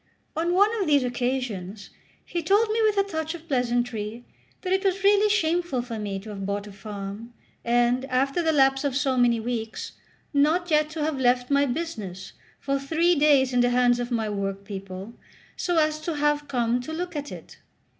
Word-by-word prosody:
On 340 Hz, +2 st, 0 dB
one 405 Hz, +3 st, +5 dB
of 375 Hz, -, 0 dB
these 285 Hz, -3 st, +4 dB
occasions 245 Hz, -6 st, -3 dB, 0.3 s
he 345 Hz, -, -3 dB
told 410 Hz, +6 st, +3 dB
me 450 Hz, +1 st, +1 dB
with 430 Hz, -2 st, +2 dB
a 395 Hz, -, +5 dB
touch 320 Hz, -4 st, -4 dB
of 335 Hz, -1 st, -12 dB
pleasantry 240 Hz, -3 st, -1 dB, 0.4 s
that 370 Hz, -1 st, 0 dB
it 385 Hz, +1 st, +1 dB
was 385 Hz, 0 st, 0 dB
really 410 Hz, +1 st, +5 dB
shameful 340 Hz, -, +1 dB
for 230 Hz, -3 st, -6 dB
me 200 Hz, -2 st, -3 dB
to 215 Hz, -, -10 dB
have 195 Hz, -1 st, -6 dB
bought 200 Hz, +1 st, -2 dB
a 205 Hz, -, -10 dB
farm, 200 Hz, +3 st, -8 dB, 0.3 s
and, 240 Hz, +2 st, +2 dB
after 270 Hz, +4 st, 0 dB
the 325 Hz, -1 st, +2 dB
lapse 270 Hz, -2 st, +3 dB
of 280 Hz, -3 st, -1 dB
so 270 Hz, -2 st, +1 dB
many 240 Hz, -2 st, +3 dB
weeks, 225 Hz, -1 st, -4 dB, 0.4 s
not 320 Hz, +5 st, +2 dB
yet 305 Hz, 0 st, +3 dB
to 310 Hz, -1 st, -4 dB
have 300 Hz, -3 st, -1 dB
left 250 Hz, 0 st, +2 dB
my 280 Hz, 0 st, +3 dB
business 225 Hz, -, -5 dB, 0.3 s
for 275 Hz, 0 st, -1 dB
three 325 Hz, +5 st, +2 dB
days 285 Hz, -4 st, +4 dB
in 245 Hz, -, +3 dB
the 245 Hz, 0 st, +4 dB
hands 245 Hz, 0 st, +3 dB
of 245 Hz, 0 st, -3 dB
my 225 Hz, -3 st, -1 dB
workpeople, 195 Hz, 0 st, -5 dB, 0.4 s
so 350 Hz, -2 st, -1 dB
as 310 Hz, -1 st, +2 dB
to 325 Hz, 0 st, -3 dB
have 295 Hz, 0 st, +1 dB
come 245 Hz, -2 st, 0 dB
to 260 Hz, -, -7 dB
look 350 Hz, +1 st, -4 dB
at 290 Hz, -1 st, -4 dB
it. -, -, -11 dB
265 Hz, 195 wpm, -25 LUFS, 235-320 Hz, 0.4 s, one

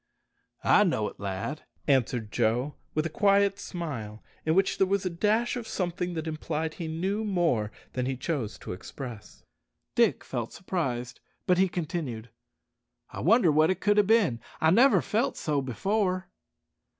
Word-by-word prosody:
"I 210 Hz, -, +6 dB
know 135 Hz, -, +1 dB
it, -, -, -17 dB
lad," 100 Hz, +9 st, -4 dB, 0.3 s
answered 125 Hz, -5 st, +1 dB
Joe, 125 Hz, +6 st, +1 dB, 0.2 s
with 155 Hz, +1 st, +1 dB
a -, -, -1 dB
quiet 200 Hz, +1 st, +3 dB
smile, 120 Hz, -, -6 dB, 0.2 s
in 160 Hz, -, +3 dB
which 195 Hz, +1 st, +2 dB
there 190 Hz, -, +4 dB
was 195 Hz, 0 st, 0 dB
a 185 Hz, -, 0 dB
dash 215 Hz, +8 st, +1 dB
of 240 Hz, -2 st, -5 dB
something 180 Hz, -1 st, -2 dB
that 160 Hz, -1 st, -3 dB
implied 160 Hz, 0 st, -3 dB
he 165 Hz, -, -5 dB
knew 190 Hz, +7 st, -1 dB
more 170 Hz, -, +1 dB, 0.2 s
than 125 Hz, 0 st, -1 dB
he 130 Hz, -1 st, -2 dB
chose 130 Hz, -6 st, -3 dB
to -, -, -5 dB
express. 115 Hz, +2 st, -9 dB, 0.5 s
Dick -, -, +3 dB
felt -, -, -4 dB
surprised, 125 Hz, -10 st, -3 dB, 0.3 s
but 180 Hz, 0 st, +3 dB
he 190 Hz, 0 st, +4 dB
continued, 150 Hz, -10 st, -4 dB, 0.8 s
"I -, -, -7 dB
wonder 195 Hz, -2 st, +5 dB
what 155 Hz, +2 st, +4 dB
it 185 Hz, -, 0 dB
could 205 Hz, 0 st, +2 dB
have 205 Hz, -2 st, +4 dB
bin. 205 Hz, -, +3 dB, 0.2 s
I 160 Hz, -, +4 dB
never 250 Hz, +8 st, +5 dB
felt 225 Hz, +5 st, 0 dB
so 150 Hz, -3 st, 0 dB
before." 185 Hz, -, -1 dB
165 Hz, 160 wpm, -28 LUFS, 130-195 Hz, 0.8 s, I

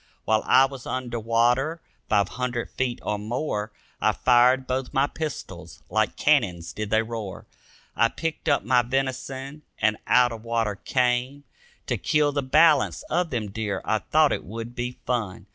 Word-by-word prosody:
While 110 Hz, 0 st, +2 dB
I 130 Hz, +1 st, +6 dB
was 135 Hz, -2 st, -8 dB
under 125 Hz, -2 st, -3 dB
water 120 Hz, +8 st, +1 dB, 0.3 s
five 100 Hz, -2 st, +3 dB
hundred 125 Hz, -1 st, -3 dB
feet 125 Hz, -2 st, -2 dB
or 105 Hz, -1 st, -2 dB
more 110 Hz, -1 st, -3 dB, 0.3 s
I -, -, +3 dB
fired 125 Hz, +1 st, +4 dB
both 130 Hz, +2 st, -3 dB
my 135 Hz, +1 st, +4 dB
pistols; 155 Hz, -2 st, -7 dB
like -, -, +1 dB
cannons 85 Hz, -2 st, +1 dB
did 105 Hz, -1 st, -4 dB
they 110 Hz, +1 st, +3 dB
roar. 110 Hz, -4 st, -6 dB, 0.5 s
I 115 Hz, -, +4 dB
picked 165 Hz, +6 st, -4 dB
up -, -, +2 dB
my 125 Hz, +3 st, +4 dB
venison 135 Hz, +3 st, -3 dB, 0.2 s
and 110 Hz, 0 st, +1 dB
out 125 Hz, -1 st, +5 dB
of 115 Hz, -1 st, -8 dB
water 115 Hz, -2 st, 0 dB
came, 125 Hz, +6 st, -1 dB, 0.4 s
To -, -, -1 dB
kill 150 Hz, -1 st, +2 dB
the 140 Hz, 0 st, -1 dB
balance 145 Hz, +2 st, +4 dB
of 175 Hz, -1 st, +1 dB
them 110 Hz, -7 st, -3 dB
deer, 105 Hz, -2 st, -3 dB
I -, -, +1 dB
thought -, -, +3 dB
it -, -, -3 dB
would 115 Hz, +4 st, -7 dB
be 125 Hz, 0 st, -4 dB
fun. 110 Hz, -8 st, -2 dB
125 Hz, 165 wpm, -25 LUFS, 110-135 Hz, 0.5 s, I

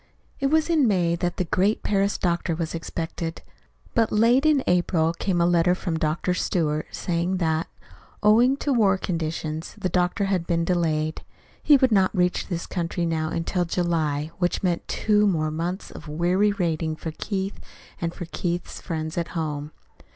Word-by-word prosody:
It 275 Hz, -, +1 dB
was 315 Hz, +2 st, +2 dB
in 315 Hz, -6 st, +3 dB
May 175 Hz, -5 st, +2 dB
that 175 Hz, 0 st, -2 dB
the -, -, +1 dB
great 190 Hz, +5 st, +1 dB
Paris 200 Hz, 0 st, +1 dB
doctor 170 Hz, -1 st, 0 dB
was 165 Hz, -1 st, -3 dB
expected; 165 Hz, 0 st, -4 dB, 0.5 s
but 225 Hz, -3 st, +2 dB
late 240 Hz, +7 st, +4 dB
in 290 Hz, -4 st, +3 dB
April 170 Hz, -2 st, +2 dB
came 180 Hz, +1 st, -1 dB
a 170 Hz, -, +4 dB
letter 175 Hz, +1 st, +3 dB
from 165 Hz, -3 st, -3 dB
Dr. 160 Hz, +4 st, 0 dB
Stewart 155 Hz, -4 st, -1 dB
saying 175 Hz, +1 st, -1 dB
that, 160 Hz, -2 st, 0 dB, 0.6 s
owing 235 Hz, +6 st, +5 dB
to 285 Hz, -1 st, 0 dB
war 200 Hz, -6 st, +4 dB
conditions, 160 Hz, -2 st, -3 dB
the 190 Hz, -3 st, -2 dB
doctor 180 Hz, +3 st, +1 dB
had 185 Hz, -4 st, -1 dB
been 170 Hz, -1 st, +1 dB
delayed. 160 Hz, -3 st, 0 dB, 0.4 s
He 295 Hz, -, +6 dB
would 260 Hz, -2 st, +3 dB
not 195 Hz, -1 st, +3 dB
reach 180 Hz, 0 st, +1 dB
this 170 Hz, -3 st, -3 dB
country 175 Hz, -1 st, -2 dB
now 160 Hz, -1 st, -1 dB
until 175 Hz, +3 st, -1 dB
July 165 Hz, -4 st, -1 dB
which 175 Hz, +1 st, 0 dB
meant 175 Hz, -2 st, 0 dB
two 210 Hz, -1 st, +2 dB
more 155 Hz, -5 st, +1 dB
months 175 Hz, +5 st, -4 dB
of -, -, -10 dB
weary 175 Hz, +7 st, +2 dB
waiting 165 Hz, -5 st, -1 dB
for 160 Hz, +1 st, -5 dB
Keith 195 Hz, +4 st, -4 dB, 0.4 s
and 170 Hz, -1 st, -1 dB
for 175 Hz, -, -7 dB
Keith's 175 Hz, +1 st, -4 dB
friends 160 Hz, -1 st, -3 dB
at 170 Hz, 0 st, -4 dB
home. 150 Hz, -2 st, -3 dB
175 Hz, 170 wpm, -24 LUFS, 165-195 Hz, 0.6 s, He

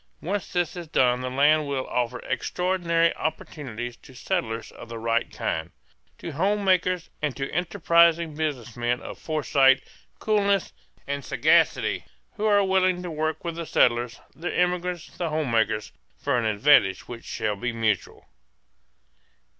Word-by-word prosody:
Once 195 Hz, +3 st, -3 dB
this 175 Hz, -2 st, -1 dB
is 175 Hz, -2 st, -7 dB
done 125 Hz, -5 st, +2 dB
the 130 Hz, -, -3 dB
land 145 Hz, +3 st, +3 dB
will 135 Hz, -2 st, -2 dB
offer 125 Hz, 0 st, -1 dB
extraordinary 170 Hz, +4 st, +1 dB
opportunities 120 Hz, -6 st, -4 dB
to 130 Hz, -, -17 dB
settlers 120 Hz, -8 st, -3 dB
of 115 Hz, -, -12 dB
the 115 Hz, -, -6 dB
right 115 Hz, +1 st, 0 dB
kind: 80 Hz, +1 st, -3 dB, 0.5 s
to 170 Hz, -, -6 dB
home 200 Hz, +7 st, 0 dB
makers 185 Hz, -2 st, +1 dB
and 150 Hz, -3 st, -2 dB
to 135 Hz, 0 st, -2 dB
enterprising 170 Hz, -2 st, +3 dB
business 145 Hz, -7 st, -3 dB
men 120 Hz, +1 st, 0 dB
of -, -, -9 dB
foresight, 140 Hz, -4 st, +3 dB, 0.3 s
coolness, 200 Hz, -3 st, +1 dB, 0.3 s
and 140 Hz, 0 st, -3 dB
sagacity -, -, +2 dB, 0.3 s
who 210 Hz, -, -3 dB
are 205 Hz, -1 st, +4 dB
willing 185 Hz, -1 st, +2 dB
to 175 Hz, -, -5 dB
work 155 Hz, 0 st, -2 dB
with 170 Hz, -2 st, -3 dB
the 170 Hz, -, -4 dB
settlers, 120 Hz, 0 st, +2 dB, 0.2 s
the 175 Hz, +3 st, -3 dB
immigrants, 180 Hz, -1 st, -1 dB
the 170 Hz, -2 st, -1 dB
home 155 Hz, -4 st, -1 dB
makers, 110 Hz, -2 st, +1 dB, 0.3 s
for 140 Hz, -2 st, 0 dB
an 120 Hz, -2 st, +1 dB
advantage 105 Hz, -3 st, +4 dB
which 120 Hz, -1 st, -8 dB
shall 105 Hz, -1 st, -2 dB
be 120 Hz, +5 st, -2 dB
mutual. 115 Hz, -2 st, -1 dB
150 Hz, 150 wpm, -25 LUFS, 120-175 Hz, 0.5 s, are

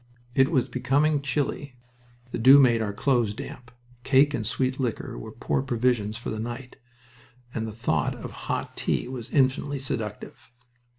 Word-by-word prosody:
It 135 Hz, 0 st, +4 dB
was 135 Hz, -7 st, +2 dB
becoming 140 Hz, +4 st, +1 dB
chilly. 140 Hz, -1 st, -2 dB, 0.6 s
The -, -, -3 dB
dew 130 Hz, +4 st, +9 dB
made 120 Hz, -4 st, +5 dB
our 105 Hz, -2 st, -1 dB
clothes 115 Hz, -1 st, +1 dB
damp. 125 Hz, -2 st, -8 dB, 0.3 s
Cake 140 Hz, +2 st, +4 dB
and 110 Hz, -6 st, -2 dB
sweet 130 Hz, +3 st, -1 dB
liquor 125 Hz, -4 st, -2 dB
were -, -, -8 dB
poor -, -, -1 dB
provisions 120 Hz, -4 st, 0 dB
for 115 Hz, -, -5 dB
the 110 Hz, -, -4 dB
night, 120 Hz, +3 st, -6 dB, 0.8 s
and 115 Hz, -1 st, -2 dB
the -, -, -5 dB
thought 105 Hz, -9 st, 0 dB
of -, -, -8 dB, 0.2 s
hot -, -, -2 dB
tea -, -, -1 dB
was 125 Hz, -3 st, -6 dB
infinitely 140 Hz, +1 st, +1 dB
seductive. 115 Hz, -6 st, -5 dB
125 Hz, 160 wpm, -26 LUFS, 115-135 Hz, 0.8 s, dew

